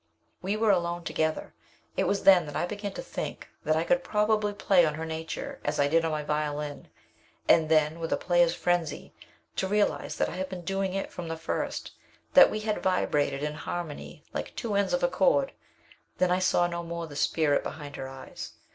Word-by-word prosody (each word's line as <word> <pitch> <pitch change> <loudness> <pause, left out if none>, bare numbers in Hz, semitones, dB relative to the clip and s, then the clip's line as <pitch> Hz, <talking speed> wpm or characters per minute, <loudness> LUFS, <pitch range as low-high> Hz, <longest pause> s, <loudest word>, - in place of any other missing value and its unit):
"We 200 +3 -1
were 220 -1 +4
alone 175 -2 0
together. 160 -1 -1 0.4
It - - +1
was 200 - 0
then 185 -5 +7
that 145 - -7
I - - +1
began 205 +2 -5
to - - -6
think - - -5 0.2
that 155 - +2
I 160 - +2
could 265 +9 +2
probably 210 0 +1
play 195 -3 +4
on 155 -2 +1
her 160 +1 -4
nature 160 0 -5
as 145 +1 -1
I 145 - +4
did 165 +3 +3
on 165 - +1
my 155 -1 -2
violin, 150 -1 -3 0.6
and 160 -2 +5
then, 155 0 +3
with 165 -1 -4
a - - +2
player's 175 -1 +3
frenzy, 175 -3 -1 0.4
to 190 - +1
realize 210 +1 0
that - - +1
I - - -6
had 185 0 -3
been 185 -2 -6
doing 195 0 -1
it 195 - -3
from 175 -2 -6
the 165 0 -4
first; 160 - -3 0.4
that - - +9
we 215 - -3
had 215 -1 -1
vibrated 145 -6 +1
in 150 0 -1
harmony 155 -1 -6
like - - -5
two 225 -3 -3
ends 200 0 +1
of - - +1
a - - +5
chord. - - +2 0.7
Then 180 -1 +2
I 180 - +3
saw 185 -1 +3
no 170 0 -2
more 170 0 -5
the 150 -3 -10
spirit 145 0 +2
behind 145 -2 -7
her 130 - -5
eyes. 135 0 -9
170 Hz, 210 wpm, -28 LUFS, 155-195 Hz, 0.7 s, that